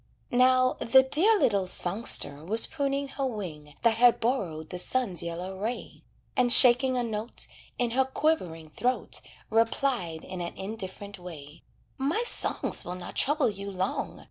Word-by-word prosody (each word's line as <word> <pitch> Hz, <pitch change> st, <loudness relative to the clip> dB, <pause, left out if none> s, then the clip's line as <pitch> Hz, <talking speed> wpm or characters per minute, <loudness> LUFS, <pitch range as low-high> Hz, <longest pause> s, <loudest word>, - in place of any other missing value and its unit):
Now, 255 Hz, +1 st, +3 dB
the 265 Hz, +3 st, +5 dB
dear 360 Hz, +12 st, +4 dB
little 200 Hz, -, +1 dB
songster 175 Hz, -6 st, +2 dB
was 220 Hz, +7 st, +3 dB
pruning 280 Hz, -2 st, -2 dB
her 275 Hz, 0 st, -3 dB
wing 155 Hz, -, -7 dB
That 230 Hz, -1 st, +3 dB
had 240 Hz, 0 st, +5 dB
borrowed 175 Hz, -, -2 dB
the 180 Hz, -, -4 dB
sun's 195 Hz, -4 st, 0 dB
yellow 175 Hz, +3 st, -6 dB
ray, 225 Hz, +4 st, -5 dB, 0.3 s
And 245 Hz, -1 st, +3 dB
shaking 255 Hz, +1 st, +6 dB
a 245 Hz, -, 0 dB
note 220 Hz, 0 st, -3 dB, 0.3 s
In 245 Hz, -1 st, 0 dB
her 265 Hz, +2 st, +2 dB
quivering 180 Hz, -, -2 dB
throat, 250 Hz, +9 st, -2 dB, 0.3 s
Replied 225 Hz, -7 st, 0 dB
in 185 Hz, -1 st, -7 dB
an 170 Hz, -, -6 dB
indifferent 200 Hz, -1 st, -7 dB
way: 155 Hz, -5 st, -11 dB, 0.4 s
"My 300 Hz, -, 0 dB
songs -, -, -1 dB
will 180 Hz, -, -6 dB
not 180 Hz, -1 st, -8 dB
trouble 290 Hz, -4 st, +2 dB
you 200 Hz, 0 st, -7 dB
long. 190 Hz, 0 st, -4 dB
225 Hz, 150 wpm, -27 LUFS, 180-255 Hz, 0.4 s, shaking